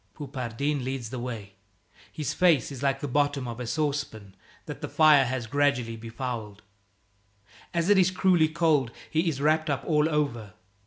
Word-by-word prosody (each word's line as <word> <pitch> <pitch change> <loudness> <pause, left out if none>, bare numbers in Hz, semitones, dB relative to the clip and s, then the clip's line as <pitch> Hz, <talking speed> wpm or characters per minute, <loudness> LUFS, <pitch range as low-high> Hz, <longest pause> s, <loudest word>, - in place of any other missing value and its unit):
Poupardin 140 0 -3
leads 130 -3 -4
the 130 - -4
way. 115 -5 -6 0.6
His 150 -1 -3
face 165 -8 +3
is 135 - -8
like 135 -1 0
the 145 - -3
bottom 145 -1 0
of 120 0 -6
a 125 - -5
saucepan 140 -9 -3 0.3
that - - -8
the - - -4
fire 150 -4 +5
has 125 -1 -3
gradually 125 -2 0
befouled. 115 -2 -6 1.1
As 170 0 0
it 205 -1 +5
is 185 -1 +4
cruelly 180 -3 +3
cold, 155 -6 +2 0.2
he 165 +2 +1
is 140 -4 -4
wrapped 155 +2 +2
up 135 -4 -1
all 150 -1 +2
over. 120 - -2
140 Hz, 165 wpm, -27 LUFS, 120-155 Hz, 1.1 s, fire